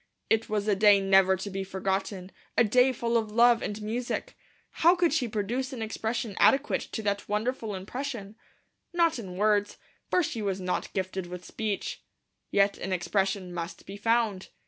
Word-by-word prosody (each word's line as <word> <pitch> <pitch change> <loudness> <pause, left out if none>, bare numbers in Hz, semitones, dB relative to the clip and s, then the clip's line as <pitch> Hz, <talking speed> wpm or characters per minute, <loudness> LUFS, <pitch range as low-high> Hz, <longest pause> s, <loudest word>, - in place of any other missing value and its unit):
It 225 0 +2
was 210 -1 -1
a 205 - +3
day 205 0 +6
never 195 -1 +4
to 190 +2 -5
be 195 0 -3
forgotten, 190 0 -3 0.3
a - - +7
day 250 +4 +4
full 235 -1 0
of 220 -2 -1
Love 235 +1 +5
and 210 +1 -4
Music. 245 - -3 0.5
How 345 +3 +7
could 345 -4 +2
she 280 -6 +1
produce 235 +5 -2
an 235 -3 -4
expression 225 0 -3
adequate 275 +2 +4
to 220 - -3
that 200 -1 -2
wonderful 220 0 -1
impression? 220 +1 -5 0.6
Not 335 -5 +2
in 185 -5 -7
words; 205 0 +2 0.3
for 360 - +3
she 230 -7 -3
was 195 -2 -1
not 180 -1 -2
gifted 190 -1 -3
with 180 0 -8
speech. 215 -3 -3 0.5
Yet 200 0 +2
an 190 - -4
expression 190 0 -1
must 170 0 -6
be 195 - -8
found. 220 -2 0
210 Hz, 170 wpm, -28 LUFS, 195-235 Hz, 0.6 s, a